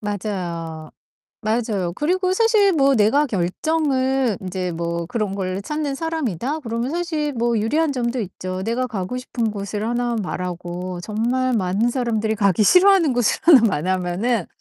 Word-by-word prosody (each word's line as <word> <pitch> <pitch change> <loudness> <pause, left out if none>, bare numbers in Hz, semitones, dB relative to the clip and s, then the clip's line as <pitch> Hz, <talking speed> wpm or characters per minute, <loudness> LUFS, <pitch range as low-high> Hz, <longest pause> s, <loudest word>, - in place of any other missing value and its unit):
맞아요. 175 -6 -4 0.5
맞아요. 215 -5 -1
그리고 365 - 0
사실 430 -1 +4
뭐 275 -4 +3
'내가 235 +8 +3
결정을 260 - 0
인제 185 -1 -3
뭐 170 0 -3
그런 210 -2 -2
거를 190 0 -3
찾는 300 +2 -3
사람이다.' 295 - -2
그러면 235 -1 -3
사실 320 -3 -2
뭐 235 0 +1
유리한 295 +8 +1
점도 245 -1 -2
있죠. 185 -1 -5
내가 235 +4 -1
가고 205 +1 -4
싶은 240 -3 -2
곳을 205 +1 -4
하나 240 0 -1
말하고 180 -1 -5
정말 240 +6 -1
많은 205 +2 +1
사람들이 225 -4 -1
가기 200 -1 +2
싫어하는 360 - +5
곳을 245 -3 +1
하나 315 -6 +8
말하면은 185 +3 0
225 Hz, 320 characters per minute, -21 LUFS, 185-270 Hz, 0.5 s, 하나